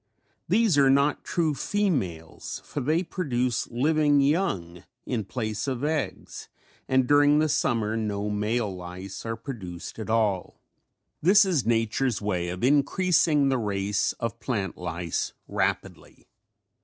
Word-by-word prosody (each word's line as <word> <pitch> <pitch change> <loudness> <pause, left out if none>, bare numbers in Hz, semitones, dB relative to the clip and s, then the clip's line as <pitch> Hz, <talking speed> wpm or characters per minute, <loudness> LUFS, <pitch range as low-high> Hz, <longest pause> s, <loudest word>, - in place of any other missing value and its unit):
These 220 -10 +3
are 135 -1 +5
not 140 +2 +2
true 165 -4 0
females 135 - -2
for 145 - -4
they 155 +7 +1
produce 125 - -1
living 145 +3 +2
young 140 - 0 0.2
in 120 -4 -2
place 110 +2 -3
of 130 -1 -2
eggs 150 -1 -3 0.4
and 130 -1 +3
during 145 +1 +5
the 155 +1 +3
summer 115 -6 0
no 105 -2 -2
male 105 0 -1
lice 90 +4 -8
are 115 - -2
produced 105 -7 -8
at 110 - -6
all. 105 -5 0 0.6
This 200 +6 +6
is 160 - 0
nature's 115 +2 +1
way 90 -4 -2
of 90 +3 -5
increasing 150 +1 +3
the 130 -2 +1
race 100 -1 0
of 115 -1 -5
plant 100 -8 -2
lice 90 -1 -3
rapidly. - - -3
120 Hz, 130 wpm, -26 LUFS, 105-145 Hz, 0.6 s, This